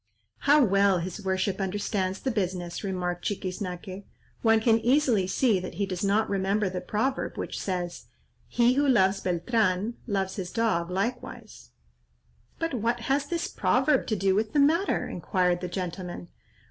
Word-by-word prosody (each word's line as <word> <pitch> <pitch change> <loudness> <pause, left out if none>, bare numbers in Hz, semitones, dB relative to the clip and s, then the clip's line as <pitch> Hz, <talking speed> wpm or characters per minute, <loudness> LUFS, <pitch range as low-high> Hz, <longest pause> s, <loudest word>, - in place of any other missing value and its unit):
"How 295 0 +7
well 195 -1 +3
his 185 +4 -5
worship 190 +1 -1
understands 195 -1 -2
the 265 - -1
business," 180 -4 -3
remarked 180 -2 -3
Chiquiznaque. 185 0 -4 0.4
"One 225 -1 +4
can 225 0 +3
easily 245 -6 +2
see 215 +1 +2
that 180 - -7
he 200 - 0
does 185 -1 -4
not 205 +2 +2
remember 195 +1 0
the 180 -1 -4
proverb 260 +6 -2
which - - -4
says: 180 -2 -4 0.4
'He 240 +1 +3
who 285 +2 +2
loves 195 -6 +3
Beltran, 190 +3 0
loves 195 -2 -1
his 185 -3 -4
dog 220 -7 0
likewise.'" 195 - -4 0.9
"But 330 -2 -2
what 235 0 -1
has 275 +4 0
this 340 +2 -2
proverb 295 -4 +1
to 220 - 0
do 195 -1 +2
with 215 +2 0
the 295 - +3
matter?" 325 +7 +2
inquired 180 -3 0
the 180 - -3
gentleman. 175 - -5
200 Hz, 155 wpm, -27 LUFS, 185-230 Hz, 0.9 s, How